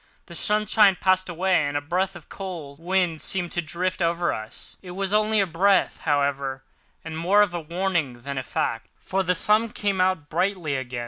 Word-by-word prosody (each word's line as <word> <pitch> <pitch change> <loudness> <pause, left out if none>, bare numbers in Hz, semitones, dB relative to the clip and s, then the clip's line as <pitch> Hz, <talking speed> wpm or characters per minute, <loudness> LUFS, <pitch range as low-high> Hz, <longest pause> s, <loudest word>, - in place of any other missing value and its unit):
The 170 - -12
sunshine 210 +2 +3
passed 185 +1 +2
away, 180 0 +2
and 145 0 -1
a - - +1
breath 180 +6 -1
of 170 -3 -12
cold 165 -8 -7
wind 175 -2 0
seemed 180 -3 -1
to 175 - 0
drift 175 +4 -2
past 170 -1 +1
us. 110 -10 -4
It 180 - -9
was 195 0 -1
only 215 0 +3
a 195 - +4
breath, 190 +3 +2
however, 140 -2 -1 0.4
and 160 -1 -6
more 190 +6 +4
in 205 - 0
the 175 - -3
nature 155 - -13
of - - -20
a - - -6
warning 175 -8 0
than 140 +1 -4
a - - -2
fact, 115 -2 -2
for 190 +1 -2
the 180 -1 +1
sun 215 +5 +3
came 200 -3 -1
out 185 -5 +1
brightly 170 -2 -1
again. 130 -2 -4
175 Hz, 210 wpm, -24 LUFS, 150-190 Hz, 0.4 s, a